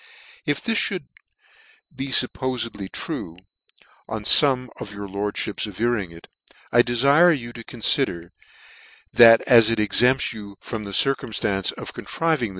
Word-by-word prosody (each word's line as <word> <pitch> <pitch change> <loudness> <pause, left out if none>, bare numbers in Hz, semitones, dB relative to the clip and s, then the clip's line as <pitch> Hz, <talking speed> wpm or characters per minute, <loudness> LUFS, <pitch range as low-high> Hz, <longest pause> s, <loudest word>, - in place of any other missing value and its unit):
" 470 +1 -22
If - - -1
this 225 -3 +1
mould 185 -6 -5 0.9
be 135 - -5
fuppofed 125 -6 -1
true, 80 +1 -5 0.7
on 110 -1 -5
fome 125 +1 +5
of 105 - -8
your 100 0 -8
lordfhips 105 +2 -3
averring 105 -1 -2
it, 85 0 -15 0.4
I 120 - +5
defire 140 +8 +3
you 120 -2 -9
to 115 - -10
confider, 110 -7 -2 0.8
that 115 -1 +7
as 115 -2 +5
it 115 -1 -1
exempts 125 +5 +2
you 100 -2 -11
from 110 -3 -7
the - - -8
circumftance 105 -4 0
of - - -9
contriving 160 -8 -2
115 Hz, 140 wpm, -22 LUFS, 105-135 Hz, 0.9 s, that